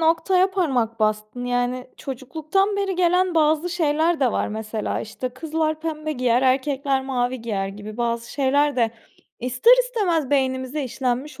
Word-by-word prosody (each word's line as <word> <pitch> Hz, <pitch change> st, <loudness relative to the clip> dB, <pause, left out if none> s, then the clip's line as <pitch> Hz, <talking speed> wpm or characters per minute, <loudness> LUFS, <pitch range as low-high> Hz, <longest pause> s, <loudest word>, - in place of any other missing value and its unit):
noktaya 360 Hz, +4 st, +3 dB
parmak 255 Hz, -, 0 dB
bastın. 215 Hz, +3 st, -1 dB
Yani, 245 Hz, +1 st, -1 dB
çocukluktan 315 Hz, -, -1 dB
beri 390 Hz, -2 st, -1 dB
gelen 360 Hz, 0 st, +2 dB
bazı 315 Hz, +2 st, +2 dB
şeyler 320 Hz, -1 st, +1 dB
de 250 Hz, -4 st, +3 dB
var -, -, 0 dB
mesela. 215 Hz, 0 st, -3 dB
İşte, 255 Hz, +4 st, -5 dB
kızlar 310 Hz, +4 st, -2 dB
pembe 310 Hz, -1 st, -3 dB
giyer, 250 Hz, -2 st, +2 dB
erkekler 270 Hz, +1 st, +1 dB
mavi 255 Hz, -1 st, -1 dB
giyer 200 Hz, -4 st, -2 dB
gibi 205 Hz, +2 st, -9 dB
bazı 235 Hz, 0 st, -2 dB
şeyler 285 Hz, +1 st, +2 dB
de 230 Hz, -2 st, +2 dB, 0.5 s
ister 250 Hz, -, +4 dB
istemez 365 Hz, -, 0 dB
beynimize 265 Hz, +1 st, 0 dB
işlenmiş 260 Hz, +3 st, -3 dB
270 Hz, 140 wpm, -23 LUFS, 245-320 Hz, 0.5 s, ister